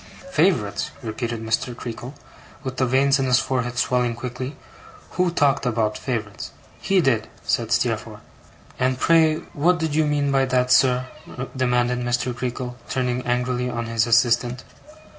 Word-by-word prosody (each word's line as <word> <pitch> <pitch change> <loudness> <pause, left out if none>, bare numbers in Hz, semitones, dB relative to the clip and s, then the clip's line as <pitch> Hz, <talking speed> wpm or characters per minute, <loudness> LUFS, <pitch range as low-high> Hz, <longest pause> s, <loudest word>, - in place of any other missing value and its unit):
'Favourites?' - - +1
repeated 115 0 -4
Mr. 115 +2 -1
Creakle, 120 +4 -7 0.5
with 130 -1 -5
the 130 - +2
veins 135 +2 +3
in 135 - +1
his 125 -1 +4
forehead 125 0 -1
swelling 125 -1 +1
quickly. 125 +3 -5 0.6
'Who 180 0 +1
talked 145 -5 +2
about 110 -3 0
favourites?' 110 -6 -4 0.3
'He 195 -1 +2
did,' 125 -8 +1 0.2
said - - -1
Steerforth. - - 0 0.6
'And 130 0 +1
pray, 160 -1 +4
what 175 +5 +3
did 160 -2 -2
you 155 +1 +3
mean 145 -1 +1
by 135 -1 +3
that, 125 -1 +1
sir?' 125 0 +4 0.5
demanded 125 -1 +1
Mr. 120 0 -1
Creakle, 125 0 -4
turning 125 -1 -1
angrily 125 0 0
on 120 -1 -3
his 115 0 0
assistant. 120 +1 +2
125 Hz, 145 wpm, -23 LUFS, 120-135 Hz, 0.6 s, his